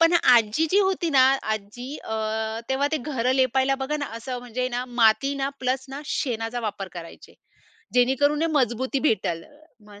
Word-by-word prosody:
पण 330 Hz, +1 st, +5 dB, 0.2 s
आजी 230 Hz, +7 st, +3 dB
जी 395 Hz, -, +4 dB
होती 350 Hz, -3 st, -1 dB
ना, 270 Hz, -3 st, +5 dB, 0.3 s
आज्जी 215 Hz, +5 st, -8 dB, 0.2 s
अ, 220 Hz, -, -4 dB, 0.5 s
तेव्हा 265 Hz, +2 st, +1 dB
ते -, -, +3 dB
घरं 255 Hz, -2 st, +1 dB
लेपायला 265 Hz, +1 st, +2 dB
बघा 300 Hz, +3 st, -2 dB
ना, 285 Hz, -2 st, -3 dB
असं 250 Hz, +2 st, -5 dB
म्हणजे 245 Hz, +1 st, -3 dB
ना 245 Hz, 0 st, -3 dB, 0.2 s
माती 275 Hz, +6 st, +4 dB
ना 270 Hz, -, 0 dB
प्लस 260 Hz, +1 st, -1 dB
ना 275 Hz, +2 st, -6 dB, 0.2 s
शेणाचा 235 Hz, -3 st, -2 dB
वापर 205 Hz, -3 st, -4 dB
करायचे, 165 Hz, 0 st, -12 dB, 0.6 s
जेणेकरून 270 Hz, +4 st, +3 dB
हे -, -, +3 dB
मजबूती 255 Hz, +3 st, -1 dB
भेटेल. 170 Hz, -5 st, -1 dB, 0.4 s
मग 205 Hz, -1 st, -14 dB
255 Hz, 170 wpm, -24 LUFS, 225-275 Hz, 0.6 s, पण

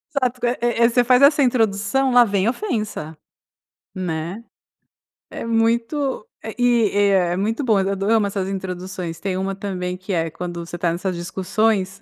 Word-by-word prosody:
Exato, 255 Hz, -2 st, -1 dB
eh 240 Hz, -, 0 dB
eh 240 Hz, -1 st, +1 dB
eh 230 Hz, -, +6 dB
você 245 Hz, +1 st, +3 dB
faz 250 Hz, +2 st, +4 dB
essa 285 Hz, 0 st, +6 dB
introdução, 245 Hz, +2 st, +1 dB
lá 245 Hz, 0 st, +7 dB
vem 200 Hz, 0 st, +1 dB
ofensa, 215 Hz, -, -3 dB, 0.8 s
né, 175 Hz, +2 st, -4 dB, 0.9 s
é -, -, -6 dB
muito 230 Hz, +3 st, 0 dB, 0.2 s
eh, 220 Hz, -, -6 dB
é 225 Hz, -5 st, +3 dB, 0.2 s
é -, -, -1 dB
muito 225 Hz, +7 st, -1 dB
bom 220 Hz, -5 st, +3 dB
eu 190 Hz, -, 0 dB
ado 195 Hz, 0 st, -3 dB
amo 220 Hz, -2 st, +3 dB
essas 195 Hz, -1 st, -3 dB
introduções, 185 Hz, -2 st, -5 dB
tem 190 Hz, 0 st, -3 dB
uma 195 Hz, +1 st, -2 dB
também 180 Hz, -2 st, -4 dB
que 185 Hz, +2 st, -6 dB
é, 165 Hz, -2 st, 0 dB
quando 175 Hz, +1 st, -6 dB
você 175 Hz, -, -6 dB
tá 170 Hz, -1 st, 0 dB
nessas 185 Hz, +1 st, -3 dB
discussões, 190 Hz, +2 st, -1 dB
200 Hz, 170 wpm, -21 LUFS, 185-235 Hz, 0.9 s, lá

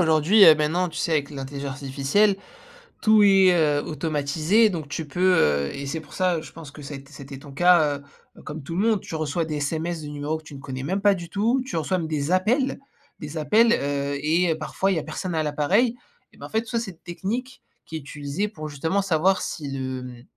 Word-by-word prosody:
Aujourd'hui, 165 Hz, +5 st, +5 dB
heu, 160 Hz, -, +10 dB
maintenant 160 Hz, +4 st, 0 dB
tu 165 Hz, -, -7 dB
sais 165 Hz, -, 0 dB
avec 145 Hz, -2 st, 0 dB
l'intelligence 140 Hz, 0 st, -5 dB
artificielle 140 Hz, +10 st, +1 dB, 0.7 s
tout 215 Hz, -1 st, +5 dB
est, 195 Hz, -2 st, +6 dB
heu, 150 Hz, -4 st, +2 dB
automatisé. 155 Hz, +7 st, +1 dB
Donc, 165 Hz, -6 st, -5 dB
tu 155 Hz, +1 st, -5 dB
peux, 180 Hz, +5 st, +2 dB
heu- 70 Hz, -, +2 dB
et 140 Hz, -, -6 dB
c'est 160 Hz, +4 st, -3 dB
pour 155 Hz, -1 st, -14 dB
ça, 180 Hz, -2 st, +1 dB
heu, -, -, -4 dB
je -, -, -11 dB
pense 155 Hz, -3 st, -11 dB
que 150 Hz, -, -12 dB
ça 145 Hz, +1 st, -7 dB
ét 135 Hz, 0 st, -11 dB
ça 145 Hz, -, -12 dB
a -, -, -7 dB
été 135 Hz, 0 st, -9 dB
ton 140 Hz, 0 st, -12 dB
cas- 155 Hz, -1 st, +4 dB, 0.4 s
heu, -, -, -13 dB
comme 155 Hz, -1 st, -7 dB
tout 165 Hz, +4 st, -6 dB
le 200 Hz, +5 st, +2 dB
monde, 215 Hz, -4 st, +2 dB
tu -, -, -7 dB
reçois 155 Hz, +1 st, -1 dB
des 155 Hz, -1 st, -4 dB
SMS 160 Hz, +3 st, -2 dB
de 150 Hz, -, -7 dB
numéros 145 Hz, +2 st, -3 dB
que 160 Hz, -, -14 dB
tu 150 Hz, -2 st, -11 dB
ne -, -, -9 dB
connais 130 Hz, -1 st, -6 dB
même 190 Hz, +7 st, -1 dB
pas 205 Hz, 0 st, +5 dB
du 175 Hz, -3 st, -7 dB
tout. 230 Hz, +8 st, +1 dB
Tu 260 Hz, -, -6 dB
reçois 165 Hz, +4 st, 0 dB
même, 165 Hz, -3 st, -3 dB
des 155 Hz, 0 st, -2 dB
appels 235 Hz, +9 st, +1 dB, 0.4 s
des 150 Hz, +1 st, -7 dB
appels, 220 Hz, +9 st, +4 dB
heu 140 Hz, -2 st, -1 dB
et 165 Hz, +2 st, +2 dB
parfois 160 Hz, +5 st, -1 dB
il -, -, +1 dB
y -, -, +1 dB
a -, -, -6 dB
personne 160 Hz, +3 st, -4 dB
à 160 Hz, -, +1 dB
l'appareil. 180 Hz, -, +1 dB, 0.4 s
Et -, -, -20 dB
ben, -, -, -8 dB
en -, -, -18 dB
fait, 220 Hz, -, 0 dB
tout 230 Hz, -, -12 dB
ça, 235 Hz, -, 0 dB
c'est 230 Hz, -4 st, -5 dB
une 175 Hz, -, -19 dB
technique 230 Hz, +9 st, -5 dB, 0.2 s
qui 160 Hz, -, -8 dB
est -, -, -5 dB
utilisée 145 Hz, +6 st, -4 dB
pour, 155 Hz, -8 st, -8 dB
justement, 160 Hz, +7 st, -1 dB
savoir 185 Hz, +1 st, +2 dB
si 145 Hz, -3 st, -5 dB
le, 130 Hz, -1 st, -4 dB
hem, 120 Hz, -1 st, -12 dB
160 Hz, 245 wpm, -24 LUFS, 145-185 Hz, 0.7 s, heu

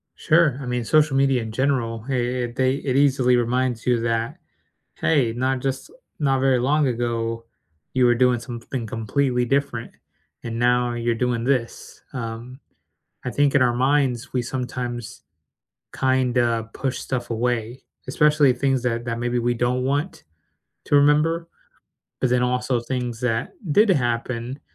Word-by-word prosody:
Sure. 155 Hz, -5 st, +3 dB
I -, -, -6 dB
mean, 125 Hz, -1 st, -2 dB
social 155 Hz, +1 st, +3 dB
media 135 Hz, -2 st, +3 dB
in 110 Hz, -1 st, -6 dB
general, 115 Hz, -3 st, -1 dB
it 135 Hz, -, 0 dB
it 120 Hz, 0 st, -2 dB
they 130 Hz, 0 st, +2 dB
it 140 Hz, -2 st, -2 dB
easily 135 Hz, -3 st, +3 dB
reminds 120 Hz, 0 st, 0 dB
you 125 Hz, -2 st, +2 dB
that, 115 Hz, 0 st, -1 dB, 0.6 s
"Hey, 130 Hz, -8 st, +1 dB
not 130 Hz, +2 st, 0 dB
just 135 Hz, 0 st, -3 dB, 0.3 s
not 135 Hz, -3 st, +2 dB
very 130 Hz, -1 st, +3 dB
long 145 Hz, +4 st, +2 dB
ago 115 Hz, -1 st, -2 dB, 0.5 s
you 130 Hz, -1 st, +3 dB
were 120 Hz, 0 st, +4 dB
doing 125 Hz, 0 st, +3 dB
something 120 Hz, 0 st, -6 dB
completely 125 Hz, +3 st, 0 dB
different, 135 Hz, -3 st, -1 dB, 0.5 s
and 115 Hz, 0 st, -4 dB
now 125 Hz, 0 st, +2 dB
you're 120 Hz, 0 st, -1 dB
doing 120 Hz, 0 st, -1 dB
this." 125 Hz, -2 st, -2 dB
Um, 120 Hz, +1 st, -6 dB, 0.7 s
I -, -, -1 dB
think 145 Hz, +1 st, +2 dB
in 145 Hz, -, +4 dB
our 120 Hz, -1 st, +3 dB
minds 130 Hz, -2 st, +1 dB
we 125 Hz, -, +1 dB
sometimes 125 Hz, -2 st, -5 dB, 0.8 s
kinda 125 Hz, -3 st, +1 dB
push 135 Hz, -1 st, -2 dB
stuff 125 Hz, -3 st, -4 dB
away, 120 Hz, +1 st, -2 dB, 0.2 s
especially 150 Hz, 0 st, +4 dB
things 130 Hz, 0 st, 0 dB
that 120 Hz, -1 st, -1 dB
that 115 Hz, -1 st, -2 dB
maybe 120 Hz, +1 st, -1 dB
we 120 Hz, 0 st, 0 dB
don't 125 Hz, +2 st, 0 dB
want 145 Hz, +7 st, -2 dB, 0.6 s
to -, -, +2 dB
remember, 155 Hz, +4 st, +3 dB, 0.7 s
but 130 Hz, -, +1 dB
then 125 Hz, 0 st, +2 dB
also 125 Hz, 0 st, 0 dB
things 120 Hz, -1 st, -4 dB
that 115 Hz, -3 st, -1 dB, 0.2 s
did 210 Hz, +7 st, +5 dB
happen, 120 Hz, -2 st, -1 dB
125 Hz, 150 wpm, -23 LUFS, 120-135 Hz, 0.8 s, did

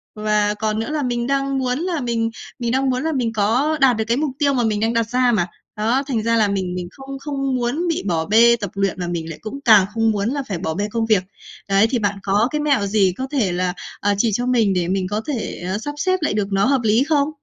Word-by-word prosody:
Và 210 Hz, -1 st, +1 dB
còn 215 Hz, 0 st, -2 dB
nữa 225 Hz, -, -3 dB
là 305 Hz, -1 st, -1 dB
mình 240 Hz, -1 st, -1 dB
đang 275 Hz, 0 st, 0 dB
muốn 255 Hz, 0 st, -1 dB
là 340 Hz, -3 st, -2 dB
mình 230 Hz, -2 st, -1 dB, 0.3 s
mình 235 Hz, -1 st, -1 dB
đang 265 Hz, +1 st, +1 dB
muốn 255 Hz, +2 st, -1 dB
là 320 Hz, -, 0 dB
mình 245 Hz, -6 st, -1 dB
có 240 Hz, +9 st, +1 dB
đạt 255 Hz, -4 st, +5 dB
được 220 Hz, -, 0 dB
cái 235 Hz, +2 st, +1 dB
mục 295 Hz, -1 st, 0 dB
tiêu 280 Hz, -1 st, +2 dB
mà 245 Hz, -, +1 dB
mình 215 Hz, -2 st, 0 dB
đang 225 Hz, +2 st, +1 dB
đặt 230 Hz, -1 st, 0 dB
ra 250 Hz, 0 st, +2 dB
mà. 200 Hz, -7 st, +1 dB, 0.3 s
Đó, 235 Hz, +6 st, +1 dB
thành 235 Hz, -6 st, -1 dB
ra 230 Hz, +1 st, +2 dB
là 215 Hz, -2 st, +3 dB
mình 190 Hz, -3 st, -2 dB
mình 180 Hz, -1 st, -4 dB
không 270 Hz, +2 st, -9 dB
không 275 Hz, -2 st, -2 dB
muốn 250 Hz, +8 st, -1 dB
bị 330 Hz, -, -1 dB
bỏ 165 Hz, -3 st, 0 dB
bê 230 Hz, +4 st, +5 dB
tập 205 Hz, -4 st, -5 dB
luyện 195 Hz, -1 st, 0 dB
và 175 Hz, -, -3 dB
mình 165 Hz, -2 st, -4 dB
lại 165 Hz, -, -8 dB
cũng 220 Hz, +6 st, -6 dB
càng 215 Hz, -5 st, +7 dB
không 225 Hz, 0 st, +2 dB
muốn 205 Hz, +1 st, -1 dB
là 280 Hz, +1 st, -2 dB
phải 195 Hz, -, -3 dB
bỏ 160 Hz, -2 st, -3 dB
bê 205 Hz, +5 st, -2 dB
công 230 Hz, 0 st, 0 dB
việc. 215 Hz, -5 st, +3 dB, 0.5 s
Đấy, 195 Hz, +2 st, +4 dB
thì 245 Hz, -, 0 dB
bạn 205 Hz, -2 st, -1 dB
có 205 Hz, +3 st, +2 dB
cái 300 Hz, -, -1 dB
mẹo 285 Hz, -8 st, +2 dB
gì 195 Hz, -2 st, +2 dB
có 260 Hz, -, -3 dB
thể 240 Hz, -11 st, +1 dB
là, 180 Hz, 0 st, -1 dB, 0.3 s
à, 205 Hz, 0 st, +1 dB
chỉ 225 Hz, +2 st, +2 dB
cho 245 Hz, +5 st, 0 dB
mình 230 Hz, -6 st, +2 dB
để 180 Hz, -2 st, 0 dB
mình 185 Hz, 0 st, -1 dB
có 210 Hz, +2 st, -1 dB
thể, 255 Hz, -11 st, -4 dB
ờ, 190 Hz, -, -1 dB
sắp 290 Hz, +7 st, -5 dB
xếp 370 Hz, +5 st, +1 dB
lại 300 Hz, -, 0 dB
được 210 Hz, -2 st, 0 dB
nó 195 Hz, 0 st, +2 dB
hợp 270 Hz, -1 st, +2 dB
lý 220 Hz, +3 st, +3 dB
không? 290 Hz, -1 st, +1 dB
230 Hz, 275 wpm, -20 LUFS, 205-270 Hz, 0.5 s, càng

